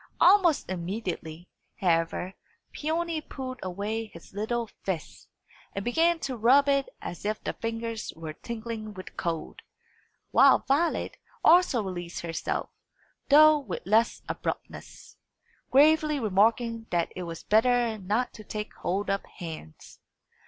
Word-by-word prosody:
Almost 360 -4 +5
immediately, 180 -2 -5 0.3
however, 175 0 0 0.4
Peony 325 +1 -2
pulled 260 -4 -7
away 205 +5 -3
his 170 -3 -14
little 230 +4 -1 0.2
fist, 180 -5 -5 0.5
and 195 - -3
began 330 +8 +3
to 265 - -3
rub 255 +5 +5
it 275 -1 +2
as 175 - -6
if 215 +1 -1
the - - -2
fingers 230 -1 -4
were 160 -1 -7
tingling 220 +1 -6
with 185 - -10
cold; 165 -2 -4 0.7
while - - +6
Violet 300 +6 +1 0.3
also 325 -9 +5
released 175 -3 -5
herself, 165 -1 -3 0.6
though 305 +1 +8
with 280 - -6
less 220 +4 +2
abruptness, - - -6 0.5
gravely 305 +2 +4
remarking 225 +2 +1
that 170 -1 0
it 185 - -5
was 165 -2 -6
better 230 0 +3
not 210 +6 -1
to 215 - -11
take 210 0 -5
hold 195 +4 -2
of 195 0 0
hands. 160 - -10
220 Hz, 125 wpm, -28 LUFS, 185-265 Hz, 0.7 s, though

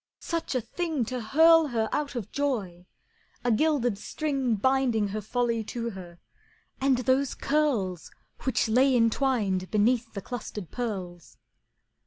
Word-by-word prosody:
Such 335 -4 -3
a 255 - +1
thing 320 -1 -2
To 250 +1 -4
hurl 320 +7 +5
her 225 -4 0
out 295 -2 -2
of 235 -6 -5
joy! 200 -11 -2 0.6
A 245 - +2
gilded 245 -4 +1
string 270 -3 -1
Binding 240 -2 +1
her 215 +2 -3
folly 235 +1 -1
to 235 +1 -4
her, 180 -3 -10 0.6
and 270 -1 +3
those 260 +2 +1
curls 240 - 0 0.3
Which 250 -3 0
lay 255 +4 +4
entwined 225 -6 +1
beneath 230 +3 +1
the 200 - -4
clustered 210 -6 -6
pearls! 185 -8 -5
240 Hz, 135 wpm, -27 LUFS, 210-270 Hz, 0.6 s, hurl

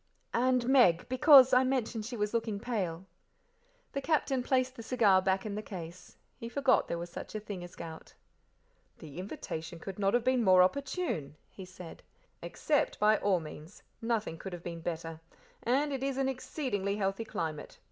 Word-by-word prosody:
"And 250 0 +2
Meg, 245 -11 +4
because 260 0 +7
I 255 +1 +6
mentioned 245 -4 -1
she 240 -1 -6
was 210 +1 -1
looking 225 -3 -1
pale." 190 -7 -3 0.9
The 275 - -3
Captain 275 -3 +1
placed 255 0 0
the 230 - -8
cigar 220 -5 +3
back 190 +1 0
in 210 - -4
the 210 - -3
case. 180 -3 -9 0.2
He 230 - -6
forgot 270 0 +2
there 170 - -2
was 170 0 -6
such - - -8
a - - -1
thing 205 -4 -7
as 175 - -11
gout. 160 -1 -9 0.8
"The 155 +1 -10
invitation 170 -3 -6
could 190 +4 -8
not 200 +2 +2
have 240 - +2
been 255 -1 +2
more 185 -2 +7
opportune," 275 - -2 0.2
he 190 - -10
said. 180 -2 -11 0.4
"Accept - - -1
by 215 0 +4
all 195 -3 +2
means; 155 +3 -11 0.2
nothing 225 -8 -2
could 190 - -7
have 175 -1 -8
been 170 -1 -6
better; 165 -1 -5 0.4
and 280 +4 +1
it 265 - -3
is 270 -1 -2
an 270 -1 +1
exceedingly 250 -7 -2
healthy 195 +1 -1
climate. 160 -8 -5
210 Hz, 175 wpm, -31 LUFS, 180-255 Hz, 0.9 s, because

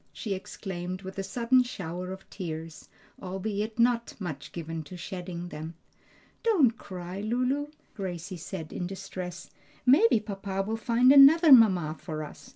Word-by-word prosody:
she 210 -5 -4
exclaimed 185 -1 -6
with 190 +1 -7
a - - -1
sudden 245 +5 +3
shower 180 -6 -5
of 190 0 -9
tears, 165 -3 -7 0.3
albeit 205 +4 -3
not 235 0 +2
much 155 -8 -6
given 165 -1 -5
to 170 +4 -10
shedding 175 -1 -6
them. 160 +2 -7 0.7
"Don't 330 - +3
cry, 185 -2 -7
Lulu," 255 +6 0 0.3
Gracie 185 -2 -5
said 165 -1 -7
in 180 - -3
distress, 185 -2 -7 0.3
"maybe 280 - +6
papa 195 -2 -4
will 220 +3 -2
find 235 +3 +4
another 290 +4 +8
mamma 185 - +6
for 155 -3 -5
us. 200 - -11
195 Hz, 145 wpm, -28 LUFS, 175-235 Hz, 0.7 s, another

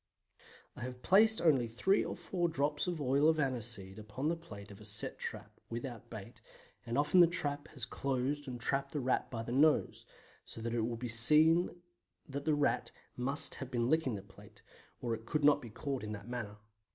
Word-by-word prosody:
I - - -10
have 125 0 -7
placed 220 +3 +5
only 135 -8 +3
three 125 - +1
or - - -5
four 175 -2 -2
drops 145 +1 -1
of 175 -3 -2
oil 140 +2 +3
of 160 - +2
aniseed 115 -7 0
upon 110 +8 -4
the 170 - 0
plate 105 -12 -11
of 100 +1 -13
a - - -11
set 105 0 0
trap - - -7
without 120 -1 -7
bait, - - -10 0.5
and 115 - -2
often 145 +5 +3
the 175 - +8
trap 145 -4 0
has 130 -6 -5
closed 140 +2 -2
and 125 -2 -6
trapped 140 +3 -1
the 150 - -1
Rat 130 -1 0
by 115 -2 -5
the 120 - -6
nose; 150 +4 +2 0.4
so - - -10
that 115 +1 -4
it 120 - 0
will 115 +1 -2
be 125 +1 -5
seen 155 +9 +5 0.5
that 140 -1 -6
the 155 - +2
Rat 145 -1 0 0.2
must 135 +4 0
have 135 - -5
been 120 0 -1
licking 160 -7 +1
the 100 - -7
plate, 100 - -18 0.4
or 120 -2 -1
it 115 0 -7
could 150 +2 -1
not 145 0 +5
be 120 - -9
caught 135 +4 -4
in 105 0 -5
that 100 +1 -9
manner. 115 -4 -6
130 Hz, 205 wpm, -33 LUFS, 115-150 Hz, 0.5 s, the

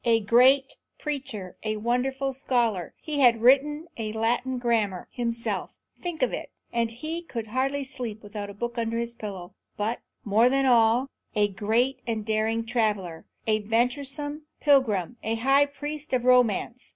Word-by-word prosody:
A 230 -1 +4
great 255 +6 +4 0.2
preacher; 270 - -4
a 215 0 -1
wonderful 265 +4 0
scholar; 235 - 0
he 300 -2 -3
had 235 -4 +5
written 295 +5 +4
a 220 -2 -3
Latin 240 +3 0
grammar 225 -6 0
himself, 235 -2 -2 0.3
think 335 -6 -2
of 250 - +1
it, - - -4 0.2
and 235 -1 +1
he 310 +9 -5
could 230 -10 -6
hardly 270 +4 0
sleep 245 -5 -6
without 205 0 -6
a 200 - -9
book 240 +2 -3
under 230 0 -1
his 235 0 -2
pillow; 195 -5 -7 0.2
but, 220 +3 -1 0.3
more 220 +4 +4
than 270 +1 +2
all, 235 0 +4 0.3
a 205 -1 +3
great 225 +7 0
and 220 -2 -2
daring 220 +1 0
traveller, 210 -8 -1 0.2
a 215 -1 +2
venturesome 275 +7 -1
pilgrim, 245 - +2
a 225 +1 -1
high 270 +5 +4
priest 290 +1 -6
of 250 -1 +1
romance. 250 -1 +2
235 Hz, 155 wpm, -26 LUFS, 220-270 Hz, 0.3 s, had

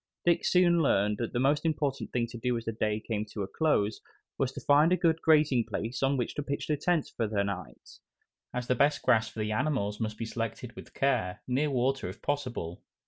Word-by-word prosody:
Dick 170 -1 +3
soon 175 -2 +4
learned 105 -7 +2
that 120 - -2
the 120 - -1
most 145 +3 +2
important 145 -4 -1
thing 120 -1 0
to 120 0 -9
do 125 +1 0
as 115 - -6
the 115 - -1
day 110 -1 -1
came 110 -1 -3
to 105 -1 -5
a - - -4
close 110 -7 0 0.3
was 130 -1 -1
to - - -6
find 150 +4 +4
a 185 - +4
good 165 -2 +2
grazing 150 -6 +4
place 115 +3 -4
on 135 +1 +2
which 120 - -2
to - - -3
pitch 145 +1 -3
tent 175 -3 +1
for 115 - 0
the 105 -1 0
night, 95 -3 -7 0.5
as 125 0 -3
the 125 - +2
best 145 +3 +2
grass 110 -3 +3
for - - -17
the 105 0 -1
animals 105 -4 -1
must 110 -2 -3
be 115 - -3
selected 115 +1 -5
with - - -12
care, 115 -10 0
near 135 +4 +1
water 135 -4 0
if 95 - -9
possible. 125 - -3
125 Hz, 220 wpm, -29 LUFS, 110-145 Hz, 0.5 s, soon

